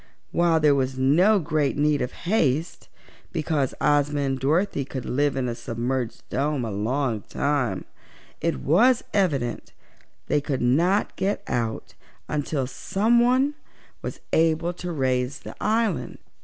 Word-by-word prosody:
While 170 -1 +3
there 150 -2 +5
was 130 -1 0
no 170 +11 +4
great 150 -5 0
need 150 0 +2
of 125 +1 -2
haste, 165 - 0 0.4
because 155 -5 -1
Ozma 145 0 +2
and 135 -1 -1
Dorothy 150 +3 +1
could 130 -1 -6
live 145 +1 +1
in 130 -2 -1
a 120 - -2
submerged 120 +1 -3
dome 140 -2 -1
a 110 - -4
long 115 +3 -1
time, 140 -9 -1 0.6
it 65 - -1
was 250 - +4
evident 145 - 0 0.5
they 145 - +1
could 140 -2 -2
not 170 +11 +2
get 195 +2 -1
out 115 -2 -2 0.3
until 145 -2 -1
someone 240 - +2 0.5
was - - -6
able 165 +1 +2
to 175 0 -6
raise 130 -2 -1
the - - -8
island. 220 -5 0
145 Hz, 135 wpm, -24 LUFS, 130-170 Hz, 0.6 s, there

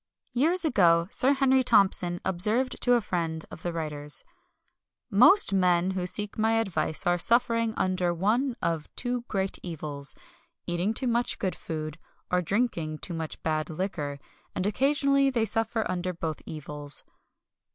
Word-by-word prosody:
Years 325 +8 +2
ago 170 - +4
Sir 270 +2 +3
Henry 265 -1 +3
Thompson 180 -6 +3
observed 215 +8 +2
to 245 - +3
a 240 - +4
friend 165 -5 -3
of - - -10
the 175 - -2
writer's: 150 -3 -3 0.9
"Most 250 - +6
men 180 -1 +3
who 185 -1 -2
seek 205 +3 -3
my 220 +1 +2
advice 180 -7 0
are 175 0 +2
suffering 230 +1 +2
under 185 -1 +1
one 225 +9 0
of 165 -3 -1
two 245 -1 -3
great 195 -1 -2
evils 150 -5 -5 0.5
eating 175 +5 -1
too 260 - -2
much 240 0 0
good 190 -2 -2
food, 155 -1 -6 0.3
or 180 0 +3
drinking 175 -5 -1
too 170 - -6
much 160 -1 -6
bad 155 0 -1
liquor; 155 -4 -3 0.4
and 185 - -1
occasionally 275 +5 +2
they 235 -4 +1
suffer 225 +1 -1
under 185 0 -2
both 165 -2 -4
evils." 150 -2 -5
185 Hz, 150 wpm, -27 LUFS, 165-235 Hz, 0.9 s, Most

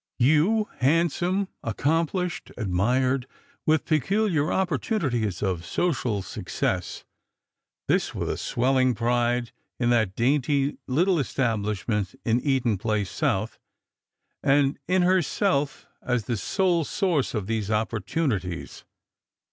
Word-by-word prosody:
You, 160 - +3
handsome, 170 +7 +2
accomplished, 165 - -1
admired, 125 +6 +1 0.4
with 155 0 +3
peculiar 165 - +1
opportunities 140 - -1
of 90 -4 -1
social 120 - -1
success; - - -3 0.4
" - - -63
this - - +1
with - - -2
a - - -1
swelling 130 0 +1
pride 120 +1 0 0.3
in 120 -1 +2
that 110 -5 +2
dainty 140 +3 +1
little 175 +7 +2
establishment 105 -6 -1
in 115 +1 +3
Eaton 125 -7 +1
place 105 -3 -1
south, 105 +4 -1 0.8
and 140 0 +2
in 185 0 +3
herself 180 -4 +1 0.2
as 125 -3 -1
the 120 - -1
sole 175 - +1
source 165 - 0
of 105 -3 -2
these 110 -1 -2
opportunities. 110 - -2
130 Hz, 110 wpm, -25 LUFS, 110-165 Hz, 0.8 s, You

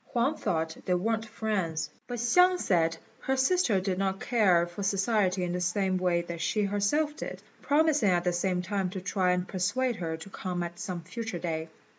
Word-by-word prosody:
Huang 250 +6 +2
thought 160 - -1
they 180 - +3
weren't 225 +4 -1
friends, 200 -8 -2 0.2
but 245 - -4
Hsiang 360 +10 +5
said 165 - +1 0.2
her 265 0 -1
sister 265 - +3
did 185 -1 -2
not 195 0 0
care 190 -8 +3
for 175 +3 -8
society 195 -1 +1
in 175 - -1
the 180 0 -2
same 185 +1 +1
way 175 -1 +1
that 170 -1 -6
she 210 - +1
herself 205 +10 +1
did, - - -6 0.2
promising 295 -6 +3
at 175 -1 +2
the 180 0 +1
same 180 0 0
time 195 -1 -1
to 190 +1 -5
try 185 0 +1
and 180 0 0
persuade 220 +6 0
her 160 -2 -3
to 160 +5 -10
come 180 -2 -3
at 170 0 -6
some 180 -2 -4
future 225 +2 -5
day. 160 -1 -3
190 Hz, 195 wpm, -29 LUFS, 175-225 Hz, 0.2 s, Hsiang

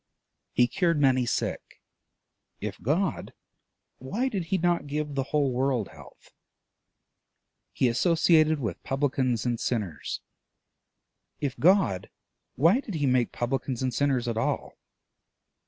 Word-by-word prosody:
He 125 - +4
cured 170 0 +1
many 130 -3 +3
sick: 120 - -3 0.8
if - - -6
God, 170 - -1 0.7
why 215 - -2
did 195 -8 -3
he 190 +4 0
not 175 -4 +1
give 150 0 -3
the 135 -1 -1
whole 145 -2 +1
world 125 -3 0
health? - - -16 1.4
He 130 - +1
associated 155 +3 +3
with 110 -10 -4
publicans 130 -4 0
and 120 -2 0
sinners: 100 - -3 1.2
if 140 -2 -2
God, 175 - +3 0.5
why 165 - +4
did 215 -9 -6
he 145 -2 0
make 125 -2 +2
publicans 130 +1 -2
and 130 -1 -1
sinners 135 -2 +1
at 115 -2 -2
all? - - -2
135 Hz, 120 wpm, -27 LUFS, 125-160 Hz, 1.4 s, He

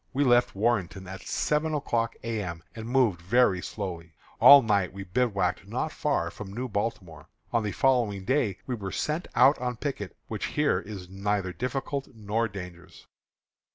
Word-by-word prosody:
We 140 +3 +2
left 120 -4 +3
Warrenton 100 -4 0
at 95 +1 -8
seven 150 +1 0
o'clock 115 -5 -1
A. 115 -2 -2
M., 85 -4 -6
and 110 -1 -7
moved 120 -9 +2
very 95 0 +3
slowly. 85 -7 -6 0.3
At 140 -1 +10
night 100 -4 +1
we 100 0 -6
bivouacked 100 +1 0
not - - -2
far - - -1
from 100 -3 -9
New 125 +5 -4
Baltimore. 100 - -4 0.3
On 115 - +3
the 105 -1 -2
following 115 -7 +1
day 125 -7 +1
we 130 - -3
were 100 -5 -4
sent 155 +3 -2
out 130 +4 +6
on 125 -1 -3
picket, 125 -8 -4
which - - -3
here - - +3
is 100 -4 -8
neither 95 0 -2
difficult 135 - -3
nor 110 +2 -1
dangerous. 90 -4 -10
105 Hz, 165 wpm, -27 LUFS, 95-125 Hz, 0.3 s, At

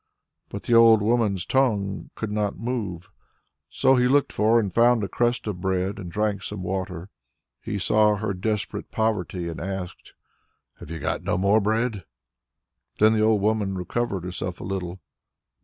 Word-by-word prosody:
But 100 - -7
the 120 - 0
old 115 -2 +7
woman's 110 -4 +1
tongue 105 -7 0
could 110 -2 -4
not 105 -1 -1
move. 100 -7 -4 0.6
So 130 0 +3
he 125 0 +3
looked 140 +2 +2
for 110 +2 +3
and 100 -5 -2
found 120 0 +4
a - - -1
crust 120 +5 0
of 100 -5 -4
bread 95 +1 -1
and 90 -3 -7
drank 105 0 -1
some 100 -2 -6
water. 95 -1 -4 0.5
He 105 - -4
saw 105 +2 +3
her 105 0 -2
desperate 105 +2 -3
poverty 95 -5 -1
and 85 - -6
asked, 95 -1 -6 0.6
"Have - - -11
you 85 - -5
got - - -2
no - - -1
more 100 +4 +3
bread?" 110 0 0 0.9
Then 110 +1 +5
the 110 - +1
old 110 -1 +3
woman 105 -2 0
recovered 95 0 -2
herself 90 0 -5
a - - -7
little. 90 -1 -4
105 Hz, 165 wpm, -24 LUFS, 95-110 Hz, 0.9 s, old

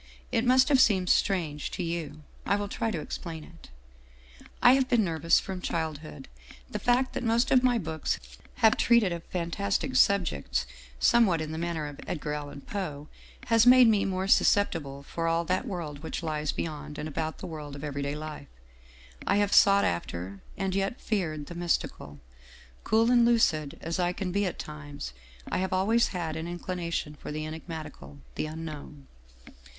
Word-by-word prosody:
It 230 0 +1
must 255 +1 +5
have 270 -3 +5
seemed 185 -4 +3
strange 160 -7 +1
to 180 - -4
you. 165 -2 -4 0.2
I 200 - +2
will 205 0 -2
try 225 +2 -2
to 185 -7 -2
explain 160 0 -6
it. 165 +1 -15 0.5
" - - -26 0.3
I 245 - +9
have 265 -1 +2
been 240 -4 +4
nervous 165 -2 +2
from 190 -2 -6
childhood. 155 -4 -4 0.4
The - - -3
fact 250 +2 +2
that - - -3
most 230 +1 +2
of 255 - +6
my 250 -1 +3
books 160 -6 -2 0.5
have 220 - +6
treated 235 -5 +4
of 170 -1 -4
fantastic 195 +8 -2
subjects, 190 - +2 0.3
somewhat 190 - +4
in 155 0 -4
the 160 - -4
manner 170 -2 -2
of 145 -1 -8
Edgar 150 -3 -3
Allan 145 -1 -6
Poe 150 -7 -5 0.4
has 230 0 +4
made 250 -1 +8
me 210 -3 +4
more 190 0 -1
susceptible 150 -10 +2
for 165 +3 -3
all 165 +1 +1
that 185 +9 -1
world 165 -8 -5
which 160 +3 -5
lies 155 -2 -1
beyond 150 -2 -5
and 150 - -4
about 155 +1 -3
the - - -8
world 150 -4 -7
of 145 - -9
every 140 -1 -3
day 140 +1 -2
life. 150 -2 -7 0.8
I - - +3
have 205 0 +2
sought 200 0 +6
after, 90 +3 -3 0.2
and 195 -1 -1
yet 195 +4 -1
feared 160 -9 -2
the 175 - -8
mystical; 170 - -2 0.6
cool 225 +2 +3
and 240 -1 +6
lucid 170 -11 +2
as 165 +2 -3
I 175 0 +1
can 185 -1 -3
be 200 +1 +1
at 180 - -4
times, 145 - -7 0.4
I - - 0
have 190 0 -1
always 220 +6 +3
had 170 -4 -3
an 160 +1 -4
inclination 175 -3 -3
for 150 - -8
the 155 +1 -4
enigmatical, 155 - -8 0.2
the - - -3
Unknown. 155 -3 -8
170 Hz, 180 wpm, -28 LUFS, 150-200 Hz, 0.8 s, I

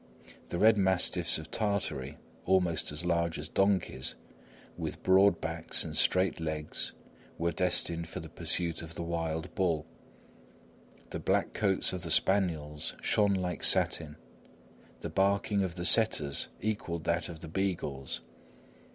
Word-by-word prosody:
The 85 - -3
red 110 +3 +5
mastiffs 90 -3 +2
of 80 0 -9
Tartary, 90 - -2 0.3
almost 90 -5 +2
as 75 +4 -3
large 85 -1 0
as 75 - -6
donkeys, 95 -8 0 0.6
with - - -6
broad 95 -1 +5
backs 80 +1 -1
and - - -6
straight 90 -1 +2
legs, 80 -2 -3 0.4
were 85 +1 0
destined 85 -1 0
for - - -6
the - - -8
pursuit 85 -2 -2
of 80 0 -9
the 85 - -4
wild 80 -1 -3
bull. 85 -5 0 1.3
The - - -4
black - - 0
coats 95 -3 +1
of 90 - -3
the 85 - -5
spaniels 80 -6 +1
shone 100 -2 +2
like 90 -1 -3
satin; 75 -2 +3 0.9
the - - -4
barking 100 +1 +2
of 90 -3 -2
the 90 -1 -4
setters 80 -11 +4
equalled 90 -6 -2
that 85 +2 0
of 80 -2 -9
the 80 - -8
beagles. 80 -7 -3
85 Hz, 140 wpm, -30 LUFS, 80-95 Hz, 1.3 s, red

